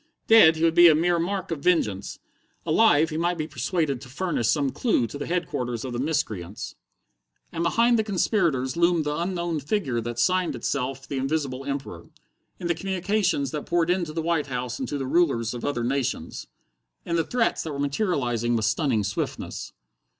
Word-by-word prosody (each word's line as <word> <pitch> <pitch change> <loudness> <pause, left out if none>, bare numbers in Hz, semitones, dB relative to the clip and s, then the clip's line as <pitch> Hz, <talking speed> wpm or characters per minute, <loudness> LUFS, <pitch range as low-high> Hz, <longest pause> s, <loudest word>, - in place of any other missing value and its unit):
Dead, 220 -8 +7
he 160 - -3
would 165 -1 +4
be 175 +1 +8
a 160 - +6
mere 170 +2 +2
mark 190 +1 -2
of 165 - -2
vengeance: 110 - 0 0.5
alive, 160 -3 +4
he 155 - -3
might 175 +1 0
be 155 -1 -3
persuaded 150 -1 -1
to 125 - -11
furnish 150 - -1
some 140 -1 +1
clue 220 - +1
to 130 +6 -7
the - - -4
headquarters 125 -9 -2
of 125 - -5
the 120 - -3
miscreants. 110 - -3 0.8
And 165 - -4
behind 230 +7 +3
the - - +2
conspirators 170 - 0
loomed 170 -1 +3
the 150 0 -1
unknown 170 -1 -2
figure 140 - -1
that 120 +1 -5
signed 180 +6 +1
itself 135 +2 -3
the 140 - -4
Invisible 135 -1 -2
Emperor 140 -1 -5 0.5
in - - -6
the 170 - +2
communications 185 -5 -1
that 150 - -5
poured 175 0 +2
in 180 0 +1
to 155 - -7
the 165 0 -2
White 165 -3 0
House 125 -2 -4
and - - -3
to 145 - -3
the 135 - -3
rulers 130 -7 +1
of 120 - -7
other 120 -5 -1
nations. 135 +1 -2 0.6
In 170 - -1
the 165 - +2
threats 240 +6 0
that 160 - -5
were 140 - -5
materializing 135 - 0
with 110 -2 0
stunning 110 0 +1
swiftness. 100 - -4
155 Hz, 190 wpm, -25 LUFS, 130-175 Hz, 0.8 s, be